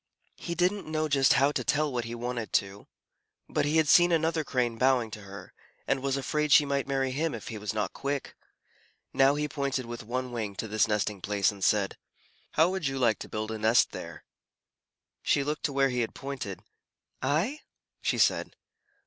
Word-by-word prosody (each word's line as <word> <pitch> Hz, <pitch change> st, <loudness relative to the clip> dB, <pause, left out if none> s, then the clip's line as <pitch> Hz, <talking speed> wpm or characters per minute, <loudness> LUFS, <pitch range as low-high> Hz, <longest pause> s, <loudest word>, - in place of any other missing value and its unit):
He 170 Hz, -, -5 dB
didn't 185 Hz, +3 st, 0 dB
know 155 Hz, 0 st, -1 dB
just 135 Hz, -3 st, +4 dB
how 140 Hz, +1 st, +4 dB
to -, -, -2 dB
tell 150 Hz, -1 st, +1 dB
what 120 Hz, -2 st, -2 dB
he 115 Hz, +1 st, -5 dB
wanted 120 Hz, -1 st, -4 dB
to, 100 Hz, +1 st, -1 dB, 0.6 s
but -, -, 0 dB
he 150 Hz, +2 st, +2 dB
had 160 Hz, -1 st, +3 dB
seen 175 Hz, +3 st, +6 dB
another 160 Hz, -1 st, +1 dB
Crane 120 Hz, -5 st, -1 dB
bowing 130 Hz, -4 st, +2 dB
to 105 Hz, -, -8 dB
her, 100 Hz, -2 st, -11 dB, 0.3 s
and 135 Hz, -1 st, 0 dB
was 135 Hz, 0 st, 0 dB
afraid 150 Hz, +2 st, -1 dB
she 145 Hz, -, +7 dB
might 140 Hz, -1 st, -1 dB
marry 135 Hz, -1 st, 0 dB
him 150 Hz, +1 st, -1 dB
if 110 Hz, -, -8 dB
he 110 Hz, -2 st, -6 dB
was 105 Hz, -1 st, -3 dB
not 105 Hz, -2 st, -2 dB
quick. 140 Hz, 0 st, -4 dB, 0.8 s
Now 135 Hz, +1 st, +4 dB
he 150 Hz, 0 st, -1 dB
pointed 140 Hz, -3 st, -2 dB
with 120 Hz, 0 st, -6 dB
one 125 Hz, +3 st, -3 dB
wing 110 Hz, -4 st, -4 dB
to 110 Hz, -, -4 dB
this 110 Hz, +2 st, +2 dB
nesting 105 Hz, -2 st, -1 dB
place, 100 Hz, +1 st, +1 dB
and 100 Hz, -2 st, -9 dB
said, 100 Hz, -1 st, +1 dB, 0.5 s
"How 160 Hz, +2 st, +5 dB
would 190 Hz, -6 st, -1 dB
you 135 Hz, 0 st, -2 dB
like 120 Hz, -4 st, +2 dB
to -, -, -8 dB
build 110 Hz, +1 st, -4 dB
a 110 Hz, -, -4 dB
nest 110 Hz, +3 st, +4 dB
there?" -, -, -8 dB, 1.0 s
She 140 Hz, -, +2 dB
looked 150 Hz, +1 st, -2 dB
where 135 Hz, -1 st, +2 dB
he 125 Hz, -1 st, -2 dB
had 115 Hz, -, -2 dB
pointed, 135 Hz, -9 st, -6 dB, 0.6 s
"I?" 190 Hz, -, 0 dB, 0.4 s
she -, -, 0 dB
said. -, -, +2 dB
135 Hz, 195 wpm, -28 LUFS, 110-145 Hz, 1.0 s, she